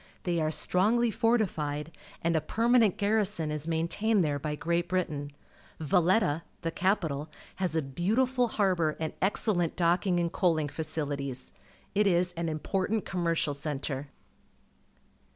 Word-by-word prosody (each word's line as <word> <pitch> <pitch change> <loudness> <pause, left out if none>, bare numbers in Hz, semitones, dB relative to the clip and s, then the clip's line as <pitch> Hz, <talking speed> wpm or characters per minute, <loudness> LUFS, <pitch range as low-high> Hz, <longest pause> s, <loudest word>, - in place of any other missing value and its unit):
They 170 -2 0
are 155 - +1
st 155 - -4
rongly 220 +5 +3
fortified, 165 -11 0 0.3
and 170 0 +2
a 160 - +2
permanent 230 +3 +3
garrison 205 -6 +1
is 150 +1 -3
maintained 170 +5 +1
there 145 -1 -1
by 150 +1 -3
Great 170 +3 -1
Britain. 155 -6 -2 0.5
Valc 175 +4 +3
tja. 145 +3 0 0.2
the 165 - -1
cap 190 +5 +1
ital, 145 0 -4 0.3
has 185 -4 -1
a 160 - +1
beautiful 235 - +1
harbour 185 -8 +1
and 160 -1 -3
excellent 190 -3 +2
docking 175 +1 +2
and 170 -1 0
coaling 160 -6 +1
facilities. 145 -4 -3 0.4
It 205 0 +3
is 180 -1 +2
an 170 -1 -2
important 190 +7 -1
commercial 170 -5 0
centre. 140 -1 -3
170 Hz, 140 wpm, -29 LUFS, 155-195 Hz, 0.5 s, rongly